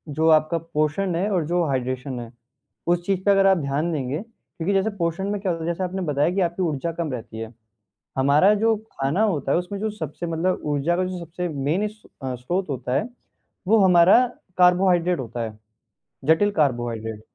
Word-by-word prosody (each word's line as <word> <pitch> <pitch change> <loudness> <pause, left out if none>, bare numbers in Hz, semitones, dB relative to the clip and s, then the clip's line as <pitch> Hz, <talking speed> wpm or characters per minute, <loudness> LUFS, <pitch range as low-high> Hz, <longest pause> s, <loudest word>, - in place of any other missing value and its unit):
जो 160 +2 +2
आपका 155 +1 +4
पोर्शन 165 +3 -1
है 190 +5 0
और 180 -4 +1
जो 175 +1 +1
हाइड्रैशन 130 -1 -2
है, 115 -1 -8 0.6
उस 175 0 +1
चीज़ 195 -1 +1
पे 200 - +5
अगर 195 -1 +5
आप 190 -1 +5
ध्यान 150 +2 -1
देंगे, 140 -2 -2
क्योंकि 200 -4 -6
जैसे 195 +2 +2
पोर्शन 170 +2 -1
में 205 0 -2
क्या 190 -2 0
होता 165 -1 -4
है, 165 - -2
जैसे 170 +2 -2
आपने 185 +1 -3
बताया 150 -2 +1
कि 195 - +1
आपकी 175 +1 -1
ऊर्जा 165 0 -1
कम 165 -2 -3
रहती 115 -2 -7
है, 115 +1 -7 0.7
हमारा 145 +9 +5
जो 225 +2 +2 0.2
खाना 140 +9 0
होता 180 -11 +1
है - - +3
उसमें 180 +3 -4
जो 215 +1 -1
सबसे 170 -4 -6
मतलब 165 +3 -1
ऊर्जा 150 +3 0
का 185 - +1
जो 185 0 -4
सबसे 175 +1 -5
मेन 155 +7 -1
स्रोत 175 - -5
होता 130 -2 -3
है 215 - 0 0.6
वो 225 +2 +5
हमारा 185 +7 +6 0.3
कार्बोहाइड्रट 180 -2 +4
होता 120 -1 -6
है, 110 -2 -6 0.7
जटिल 160 +7 +4
कार्बोहाइड्रट। 120 - -1
170 Hz, 190 wpm, -23 LUFS, 140-185 Hz, 0.7 s, हमारा